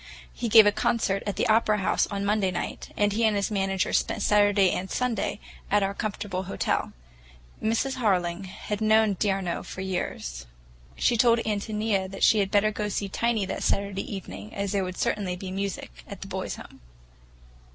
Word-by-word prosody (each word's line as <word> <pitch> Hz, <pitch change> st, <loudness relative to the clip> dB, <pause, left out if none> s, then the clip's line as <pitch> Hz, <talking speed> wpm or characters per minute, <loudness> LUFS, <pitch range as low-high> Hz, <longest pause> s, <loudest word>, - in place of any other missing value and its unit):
He 235 Hz, -, -3 dB
gave 220 Hz, 0 st, +9 dB
a 205 Hz, -, +5 dB
concert 200 Hz, -2 st, 0 dB
at 205 Hz, -, -1 dB
the -, -, 0 dB
Opera 215 Hz, -1 st, +3 dB
House 195 Hz, -, +1 dB
on 200 Hz, -1 st, -3 dB
Monday 205 Hz, -2 st, +2 dB
night, 180 Hz, -, -5 dB
and 205 Hz, -1 st, +2 dB
he 230 Hz, +2 st, 0 dB
and 220 Hz, -2 st, +3 dB
his 200 Hz, +1 st, -1 dB
manager 195 Hz, -2 st, 0 dB
spent 210 Hz, -, 0 dB
Saturday 205 Hz, -2 st, +4 dB
and 190 Hz, +1 st, -3 dB
Sunday 250 Hz, -4 st, -1 dB, 0.3 s
at 205 Hz, 0 st, +3 dB
our 195 Hz, 0 st, -1 dB
comfortable 200 Hz, -3 st, -3 dB
hotel. 190 Hz, -, -1 dB, 0.7 s
Mrs. 230 Hz, +5 st, 0 dB
Harling 185 Hz, -5 st, 0 dB
had 205 Hz, +2 st, -5 dB
known 220 Hz, -1 st, +4 dB
d'Arnault 195 Hz, -4 st, 0 dB
for 185 Hz, -, -7 dB
years. 60 Hz, -, -4 dB, 0.5 s
She 240 Hz, -, +2 dB
told 235 Hz, 0 st, +5 dB
Ántonia 210 Hz, -2 st, -1 dB
she 220 Hz, -, +5 dB
had 195 Hz, -1 st, +1 dB
better 205 Hz, +1 st, +3 dB
go 210 Hz, 0 st, -3 dB
to -, -, -2 dB
see 200 Hz, 0 st, -2 dB
Tiny 225 Hz, 0 st, 0 dB
that -, -, -4 dB
Saturday 200 Hz, -1 st, -1 dB
evening, 105 Hz, -, -7 dB
as 200 Hz, -1 st, -2 dB
there 200 Hz, -1 st, +1 dB
would 185 Hz, 0 st, -5 dB
certainly 190 Hz, -4 st, -1 dB
be 185 Hz, +1 st, -7 dB
music 195 Hz, -, -4 dB, 0.2 s
at -, -, -9 dB
the -, -, -6 dB
Boys' -, -, -4 dB
Home. -, -, -13 dB
200 Hz, 185 wpm, -26 LUFS, 190-215 Hz, 0.7 s, gave